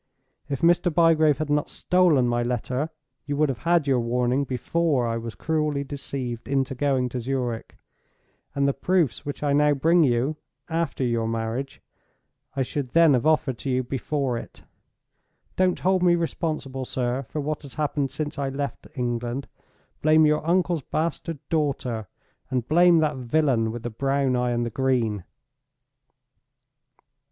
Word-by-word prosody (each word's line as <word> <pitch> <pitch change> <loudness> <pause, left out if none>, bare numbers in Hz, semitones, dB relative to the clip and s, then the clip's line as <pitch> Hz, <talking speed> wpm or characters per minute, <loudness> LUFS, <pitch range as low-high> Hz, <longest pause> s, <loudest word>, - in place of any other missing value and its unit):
If 140 +1 -3
Mr. 175 +1 +4
Bygrave 160 -2 +4
had 155 -1 -3
not 150 0 +1
stolen 175 -8 +3
my 120 0 +1
letter, 125 +4 -2 0.4
you 145 -1 -2
would 150 -1 +3
have 130 - -3
had 170 -2 +2
your 135 -3 +2
warning 125 +3 +1
before 140 +1 0
I 115 -1 -1
was 115 -1 -6
cruelly 150 -3 -1
deceived 135 -4 -5
into 135 -1 0
going 130 -1 +1
to 125 - -4
Zurich; 125 -2 -3 0.8
and 140 0 +2
the 140 - +2
proofs 165 -2 0
which 145 - -5
I 145 -1 +2
now 145 0 +4
bring 165 +5 +4
you, 130 +3 +1 0.3
after 165 -4 -1
your 115 -2 0
marriage, 115 +4 -3 0.7
I 135 - +1
should 130 -1 -4
then 165 -3 +6
have 125 +3 +2
offered 145 -6 +2
to 140 - -4
you 130 0 +1
before 135 0 -2
it. - - -12 0.9
Don't 185 -1 +2
hold 185 0 +1
me 175 -1 +5
responsible, 155 -5 -3
sir, 125 0 -2
for 140 +3 -6
what 150 +1 -2
has 140 -3 -11
happened 145 -2 -1
since 150 +2 -4
I 140 -1 -1
left 140 +1 -4
England. 120 +1 -2 0.5
Blame 155 +1 +5
your 150 0 +2
uncle's 175 -2 +2
bastard 165 +3 -3
daughter, 135 - -1 0.4
and 125 -2 -1
blame 170 +1 +5
that 150 -3 0
villain 125 -3 +1
with 120 0 -7
the 120 - -4
brown 135 +2 0
eye 125 0 +1
and 120 0 0
the 115 - -4
green!" 115 -6 0
140 Hz, 160 wpm, -25 LUFS, 125-155 Hz, 0.9 s, then